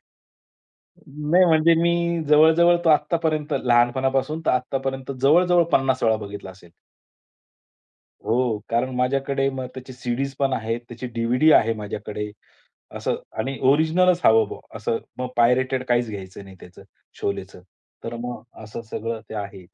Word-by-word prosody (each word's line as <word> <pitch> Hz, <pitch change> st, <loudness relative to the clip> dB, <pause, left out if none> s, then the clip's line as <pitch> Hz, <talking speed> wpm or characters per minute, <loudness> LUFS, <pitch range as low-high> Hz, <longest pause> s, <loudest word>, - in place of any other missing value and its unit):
नाही -, -, -69 dB, 1.3 s
म्हणजे 165 Hz, -1 st, +4 dB
मी 170 Hz, -1 st, +1 dB
जवळ-जवळ 160 Hz, +3 st, +5 dB
तो -, -, +3 dB
आत्तापर्यंत 155 Hz, -1 st, +1 dB
लहानपणापासून 130 Hz, +5 st, +1 dB
तर -, -, +4 dB
आत्तापर्यंत 135 Hz, +1 st, -2 dB
जवळ-जवळ 175 Hz, +5 st, +4 dB
50 130 Hz, -1 st, +2 dB
वेळा 110 Hz, -1 st, +3 dB
बघितला 100 Hz, -2 st, -8 dB
असेल. 90 Hz, -2 st, -17 dB, 1.5 s
हो. 115 Hz, -1 st, 0 dB
कारण 120 Hz, +3 st, 0 dB
माझ्याकडे 135 Hz, +2 st, 0 dB
मग 130 Hz, -1 st, -5 dB
त्याची 130 Hz, 0 st, -9 dB
सीडीज 125 Hz, +3 st, -3 dB
पण 135 Hz, -1 st, +1 dB
आहे. 115 Hz, 0 st, -1 dB
त्याची 120 Hz, +1 st, -9 dB
डीव्हीडी 120 Hz, +6 st, +2 dB
आहे 115 Hz, -, +4 dB
माझ्याकडे. 105 Hz, 0 st, -6 dB, 0.7 s
असं -, -, -2 dB, 0.2 s
आणि 135 Hz, 0 st, -3 dB
ओरिजिनलच 170 Hz, +4 st, +3 dB
हवं 110 Hz, -1 st, +5 dB
मग. -, -, -8 dB, 0.2 s
असं 110 Hz, +2 st, -2 dB, 0.2 s
मग 125 Hz, -, -3 dB
पायरेटेड 130 Hz, +2 st, +2 dB
काहीच 120 Hz, -1 st, +1 dB
घ्यायचं 100 Hz, -1 st, -8 dB
नाही 95 Hz, -1 st, -14 dB
त्याचं, 90 Hz, +2 st, -14 dB, 0.4 s
शोलेचं. 100 Hz, -2 st, -4 dB, 0.4 s
तर 115 Hz, -, -5 dB
मग 125 Hz, 0 st, -6 dB, 0.2 s
असं 110 Hz, +2 st, -8 dB
सगळं 115 Hz, 0 st, -4 dB
ते -, -, -8 dB
आहे 100 Hz, -2 st, -6 dB
125 Hz, 135 wpm, -23 LUFS, 110-145 Hz, 1.5 s, जवळ-जवळ